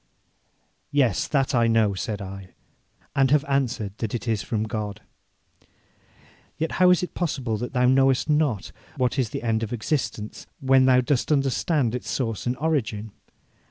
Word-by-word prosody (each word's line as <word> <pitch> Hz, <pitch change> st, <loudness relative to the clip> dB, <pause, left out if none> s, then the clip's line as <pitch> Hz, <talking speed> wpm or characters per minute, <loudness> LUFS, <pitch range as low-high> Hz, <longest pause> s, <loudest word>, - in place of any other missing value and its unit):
'Yes, 135 Hz, -9 st, +1 dB
that 135 Hz, -2 st, +1 dB
I 120 Hz, -2 st, +3 dB
know,' 110 Hz, -3 st, +3 dB
said 100 Hz, +1 st, -4 dB
I, 95 Hz, -1 st, -9 dB, 0.6 s
'and 135 Hz, -1 st, +3 dB
have 145 Hz, 0 st, +3 dB
answered 125 Hz, -7 st, -1 dB
that 115 Hz, 0 st, -2 dB
it 120 Hz, -, -5 dB
is 110 Hz, -2 st, 0 dB
from 110 Hz, -2 st, -2 dB
God.' 105 Hz, -2 st, -4 dB, 1.6 s
'Yet 160 Hz, +1 st, -2 dB
how 180 Hz, -, +7 dB
is 180 Hz, 0 st, +4 dB
it 180 Hz, -, -5 dB
possible 135 Hz, -10 st, -2 dB
that 120 Hz, +4 st, -5 dB
thou 125 Hz, -1 st, +2 dB
knowest 135 Hz, +1 st, +3 dB
not 150 Hz, -9 st, +1 dB, 0.3 s
what 130 Hz, +1 st, 0 dB
is 125 Hz, -5 st, +1 dB
the -, -, -5 dB
end 115 Hz, -1 st, 0 dB
of 110 Hz, -, -3 dB
existence, 120 Hz, -3 st, -3 dB
when 135 Hz, -2 st, +4 dB
thou 130 Hz, -1 st, +5 dB
dost 135 Hz, +2 st, 0 dB
understand 140 Hz, -, +1 dB
its 125 Hz, -, -4 dB
source 115 Hz, -7 st, -2 dB
and 125 Hz, +1 st, -1 dB
origin? 115 Hz, -8 st, -1 dB
125 Hz, 160 wpm, -24 LUFS, 110-140 Hz, 1.6 s, how